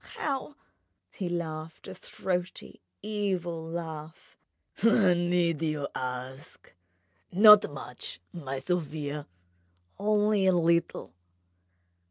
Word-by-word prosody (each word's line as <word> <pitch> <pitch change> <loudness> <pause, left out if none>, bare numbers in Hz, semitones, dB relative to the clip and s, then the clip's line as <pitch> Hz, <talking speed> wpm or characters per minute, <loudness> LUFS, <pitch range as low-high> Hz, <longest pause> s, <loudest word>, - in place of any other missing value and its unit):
"How?" 280 0 -3 0.6
He 185 -4 -4
laughed 160 -2 -5
a 190 - -7
throaty, 180 0 -4 0.2
evil 190 -6 -2
laugh. 160 -1 -7 0.5
"Need 175 -6 +3
you 155 -3 -1
ask? 130 +3 -6 0.6
Not 210 -2 +8
much, 130 -9 -7
my 135 -6 -5
Sofia... 150 -1 -3 0.7
only 210 -1 +2
a 185 - +5
little 170 - +1
170 Hz, 85 wpm, -28 LUFS, 155-190 Hz, 0.7 s, Not